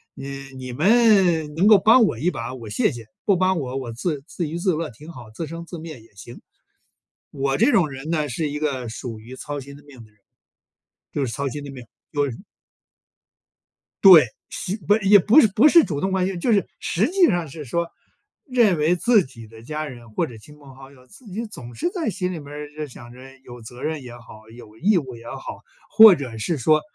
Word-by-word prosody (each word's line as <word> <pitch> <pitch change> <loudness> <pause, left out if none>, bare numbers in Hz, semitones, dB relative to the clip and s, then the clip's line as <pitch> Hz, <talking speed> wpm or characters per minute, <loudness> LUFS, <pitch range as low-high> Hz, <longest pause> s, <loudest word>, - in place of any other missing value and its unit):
你 135 +1 -8 0.3
你 130 -1 -7
们 185 - +3
能 180 +5 +3
够 215 -1 +8
帮 225 +6 +5
我 120 - -2
一 170 +7 +1
把， 120 -2 -6
我 115 -4 -9
谢 105 - +1
谢。 115 -2 -9 0.2
不 200 - +3
帮 185 -1 +1
我， 130 -3 -5
我 130 -3 -5
自 145 +3 -3
自 170 -4 -4
娱 165 - -4
自 180 +1 0
乐 160 0 -3
挺 150 +8 -13
好。 125 -8 -12
自 160 +9 -6
生 165 +2 -8
自 175 - -9
灭 155 -5 -9
也 115 - -22
行。” 120 +5 -12 0.9
我 135 0 -1
这 240 +7 +4
种 170 -5 +3
人 135 +3 -8
呢， 155 -3 -1
是 150 +5 -2
一 145 - -4
个 135 -5 -2
属 115 0 -7
于 120 +4 -11
操 145 +2 -6
心 140 +1 -11
的 145 - -18
命 135 -5 -15
的 110 - -23
人。 105 - -34 0.9
就 140 - -1
是 120 - -5
操 140 +4 -3
心 145 +3 -6
的 140 - -8
命， 130 -2 -10 0.3
就 145 -1 0
是 115 - -10 1.6
对， 180 -7 +10 0.2
实 195 +3 -4
不， 205 - +5
也 205 0 +6
不 220 - +6
是 225 - +4
不 210 +9 +4
是 335 +2 +7
主 145 -5 -4
动 190 +3 -1
关 185 -1 +1
心， 190 -2 -4
就 230 +7 +1
是 200 -2 +2
实 200 +7 0
际 370 -1 +4
上 175 - -1
是 150 +2 -9
说， 170 +7 -2 0.6
认 235 - +2
为 155 +4 +2
自 215 +2 +3
己 115 -5 -13
的 110 0 -14
家 155 +5 -5
人 120 -5 -11
或 110 - -1
者 115 -2 -11
亲 150 +7 -16
朋 140 -2 -15
好 135 0 -13
友， 130 -2 -20
自 225 - -18
己 210 +4 -5
总 120 - -11
是 345 - -2
在 350 -4 -3
心 185 -3 -3
里 175 - -5
面 145 -2 -11
儿 150 0 -8
就 155 0 -6
想 120 -3 -13
着 125 - -14 0.2
有 120 0 -11
责 120 +3 -11
任 155 -2 -3
也 120 -1 -10
好、 110 -2 -15
有 110 -2 -14
义 195 - +3
务 130 -6 -6
也 115 0 -14
好， - - -8 0.3
或 220 -3 +9
者 125 -8 -7
是 155 +8 -2
说 155 +5 +3
150 Hz, 245 characters per minute, -22 LUFS, 125-185 Hz, 1.6 s, 对